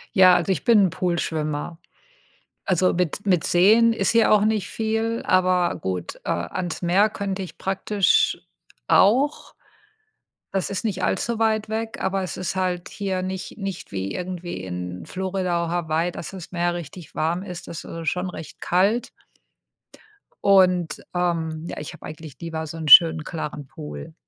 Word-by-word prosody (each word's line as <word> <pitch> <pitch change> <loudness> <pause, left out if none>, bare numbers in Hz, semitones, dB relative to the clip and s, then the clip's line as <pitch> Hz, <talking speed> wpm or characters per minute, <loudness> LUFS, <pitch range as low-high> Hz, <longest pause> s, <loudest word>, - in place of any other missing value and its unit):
Ja, 185 -2 +7
also 175 +2 +1
ich 185 - -1
bin 220 -5 +5
'n - - -3
Poolschwimmer. 165 -3 -2 0.9
Also 185 -1 +2
mit 180 +2 -1
mit 180 -4 +2
Seen 220 +6 +5
ist 200 -4 0
hier 230 -2 +4
auch 210 -1 +5
nicht 215 -3 0
viel, 225 +1 -1
aber 185 -1 +2
gut, 90 - -4
äh, - - -2
ans 170 - -3
Meer 190 +5 +3
könnte 195 -2 -3
ich 185 - -9
praktisch 210 - +2 0.5
auch, 265 +9 +3 1.0
das 195 -1 -1
ist 200 +3 -4
nicht 195 -4 -2
allzu 235 -1 0
weit 220 -1 +1
weg, 220 +1 -3
aber 190 0 0
es 180 - -5
ist 185 +1 -3
halt 180 -2 -2
hier 190 -2 -3
nicht 190 0 -5
nicht 195 -3 -6
wie 95 0 -3
irgendwie 175 - -5
in 90 0 -6
Florida 185 -2 -2
oder 165 - -4
Hawaii, 165 0 0
dass 170 - -7
das 185 -4 -9
Meer 175 -1 0
richtig 170 0 -9
warm 170 +4 -1
ist. 180 -3 -8
Das 165 - -7
ist 165 -1 -7
schon 180 +1 -3
recht 160 -3 -10
kalt. 200 +7 +1 1.3
Und, 180 -4 +4
ähm, 165 -3 -1
ja, - - -6
ich 150 - -7
habe - - -12
eigentlich 155 -2 -9
lieber 160 -1 -4
so 160 +1 -8
'n 160 -1 -5
schönen 160 +2 +8
klaren 150 -3 -5
Pool. 75 - -9
180 Hz, 165 wpm, -23 LUFS, 165-195 Hz, 1.3 s, schönen